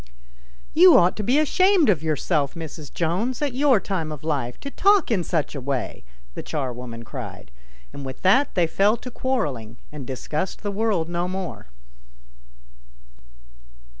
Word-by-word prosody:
"You 350 +2 +8
ought 175 +1 +4
to 210 - -2
be 250 +7 +2
ashamed 365 +2 +4
of 180 -8 +3
yourself, 155 -2 0
Mrs. 160 -2 -8
Jones, 185 +10 -1
at 290 -4 -1
your 265 -3 +4
time 175 -6 -3
of 150 -2 -8
life 140 -6 -2
to 280 - -6
talk 400 -6 +3
in 190 -6 +1
such 160 -3 -1
a 140 - -5
wajV 130 -1 -3 0.3
the - - -5
charwoman 125 -4 -5
cried, - - -8 0.4
and 140 - -7
with 130 -1 -8
that 255 +10 +3
they 175 -3 +4
fell 200 +7 +2
to 250 +2 -9
quarrelling 140 - -2
and 145 -4 -8
discussed 150 +9 -4
the 205 - -2
world 200 -5 0
no 175 +1 -2
more. 185 - -5
175 Hz, 155 wpm, -23 LUFS, 145-235 Hz, 0.4 s, You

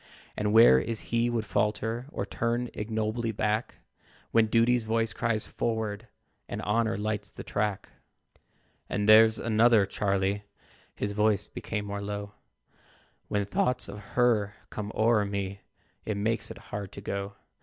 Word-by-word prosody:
And 105 0 0
where 110 - +8
is 115 -2 -3
he 115 +1 +3
would 115 -2 -1
falter, 110 +4 -1
Or 100 - -3
turn 120 +3 -2
ignobly 110 +2 -2
back, 105 +1 -1 0.6
When 115 -1 +4
Duty's 115 +2 +3
voice 115 0 0
cries 115 -3 -1
'Forward,' 110 -1 -3 0.4
And - - -4
Honor 110 +1 +1
lights 105 -1 -3
the - - -9
track? 105 -1 -2 1.0
"And 105 0 -1
there's 110 +1 +7
another, 115 -2 +4
Charlie 100 0 0 0.5
(His 100 - -2
voice 105 -1 +1
became 105 -2 -4
more 100 0 -4
low), 100 0 -5 1.0
When 100 -1 0
thoughts 125 +5 0
of 100 +1 -8 0.2
HER 110 -4 +2 0.2
come 105 0 -5
o'er 110 -1 +3
me, 100 -1 -4 0.4
It 105 -2 -3
makes 110 +2 -1
it - - -8 0.2
hard 100 -2 -4
to 100 - -8
go. 100 0 -4
105 Hz, 145 wpm, -28 LUFS, 100-115 Hz, 1.0 s, where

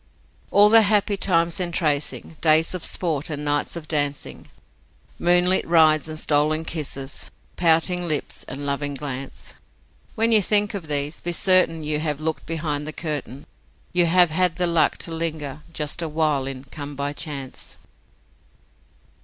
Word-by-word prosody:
All 205 +1 +6
the 225 +1 +7
happy 205 -1 +1
times 170 -3 +2
entrancing, 165 -3 -1
days 160 +1 +4
of 180 -3 -5
sport 160 -5 +2
and 150 -1 -4
nights 145 +2 0
of 165 -2 -8
dancing, 145 -2 -3 0.7
Moonlit 180 +1 +3
rides 155 -2 +4
and 155 - -6
stolen 155 +1 +1
kisses, 140 -4 -4 0.3
pouting 175 +1 +3
lips 155 -3 -3
and 140 +2 -6
loving 145 0 -2
glance: 135 -1 -6 0.6
When 225 +1 +2
you 220 -2 +6
think 205 +2 +1
of 190 -6 -6
these 145 +1 -2
be 175 - -3
certain 175 -2 +3
you 150 0 -1
have 150 -2 -2
looked 160 0 -4
behind 150 -2 -3
the 155 - -6
curtain, 145 -4 -5 0.5
You 175 -1 +4
have 175 -1 +4
had 180 0 +1
the 180 0 0
luck 170 -2 +2
to 165 - -5
linger 155 -3 -4
just 150 +1 -1
a 165 - -3
while 150 -3 0
in 135 -1 -6
'Come 145 +1 -8
by 140 +1 -3
chance'. 140 -3 -6
155 Hz, 155 wpm, -22 LUFS, 145-175 Hz, 0.7 s, the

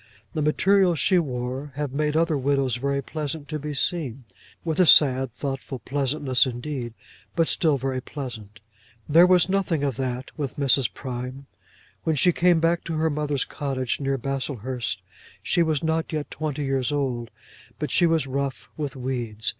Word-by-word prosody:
The 155 - -1
materials 180 +3 +3
she 185 +6 +4
wore 130 -1 -4
have 145 -2 -3
made 150 +1 0
other 165 -1 +2
widows 135 -3 +1
very 140 +2 -1
pleasant 150 0 -4
to 155 0 -3
be 150 0 -5
seen, 135 -5 -1 0.4
with 160 0 -1
a 180 - +6
sad 135 -4 +6
thoughtful 135 -1 -4
pleasantness 135 +1 +1
indeed, 120 -1 -5 0.4
but 165 - +3
still 155 -4 +2
very 130 0 -2
pleasant. 115 -7 -8 0.5
There 165 +4 +7
was 180 -2 +5
nothing 185 -6 0
of 135 -5 -1
that 130 -1 -3
with 140 -4 -4
Mrs. 135 -2 +3
Prime. 130 +1 -6 0.6
When 160 - +1
she 175 +5 +4
came 175 0 +3
back 170 +1 +2
to 170 - -3
her 160 0 +1
mother's 145 -2 -1
cottage 135 -4 -2
near 135 -1 0
Baslehurst 130 -2 -3 0.4
she 175 - +2
was 160 -3 +1
not 160 0 0
yet 155 -2 -3
twenty 150 -2 -3
years 135 -1 0
old, 130 -5 -1 0.5
but - - -3
she 175 - +4
was 165 -2 +2
rough 135 0 -3
with 145 -3 -4
weeds. 120 -4 -2
140 Hz, 165 wpm, -25 LUFS, 130-155 Hz, 0.6 s, There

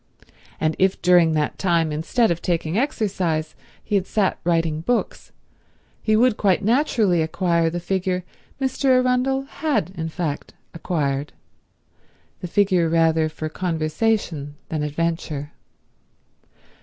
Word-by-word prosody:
And 155 0 0
if 190 0 +2
during 175 -2 +5
that 150 -1 -1
time 170 -4 +1
instead 170 +10 +1
of 170 - -2
taking 165 -1 -1
exercise 195 - -1 0.3
he 210 - -7
had 195 -2 +2
sat 200 -4 0
writing 165 -2 +1
books, 240 +8 -2 0.7
he 215 - +2
would 235 0 +3
quite 195 -1 +2
naturally 220 - +2
acquire 170 +1 +1
the 175 +2 -3
figure 185 0 -1 0.4
Mr. 270 +1 -2
Arundel 255 +1 +3
had 270 - -2
in 160 -4 -4
fact 155 -4 -4 0.2
acquired—the 145 -4 -2 1.2
figure 185 -3 +2
rather 160 -1 +3
for 155 0 -5
conversation 160 -2 -1
than 155 -2 -2
adventure. 150 -1 -2
175 Hz, 120 wpm, -22 LUFS, 160-210 Hz, 1.2 s, during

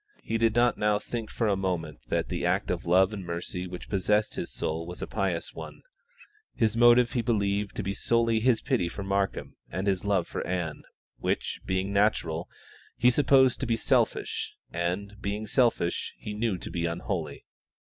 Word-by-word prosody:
He 115 0 -1
did 115 0 +3
not 120 0 +3
now 105 0 +3
think 115 +1 -5
for 115 - -1
a 100 - +3
moment 90 -5 -2
that - - 0
the - - -3
act - - +1
of - - -3
love 95 +4 +4
and 100 -3 -5
mercy 90 +1 -4
which 90 0 -8
possessed 105 +2 +1
his - - -4
soul 80 +1 -3
was 90 - -6
a - - -1
pious 95 -5 -2
one; - - -9 0.7
his 110 -1 +1
motive 120 0 +6
he 120 - 0
believed 100 -3 0
to - - -2
be 100 +1 -2
solely 115 +2 +2
his 120 0 +3
pity 85 - +1
for 100 - -6
Markham 100 0 -1
and 95 - -3
his 95 -2 +1
love 100 -4 +1
for - - -4
Ann, 85 -4 -2 0.4
which, - - -1
being 95 +1 0
natural, 90 -5 +1 0.5
he 125 +1 +5
supposed 130 -1 +4
to 130 - -2
be 115 -1 +1
selfish, - - 0 0.2
and, 90 +4 -2
being 105 +2 -2
selfish, 115 -6 +1
he 105 - -6
knew 105 -2 0
to - - -7
be 85 -1 -1
unholy. 85 -2 -4
100 Hz, 185 wpm, -28 LUFS, 90-115 Hz, 0.7 s, motive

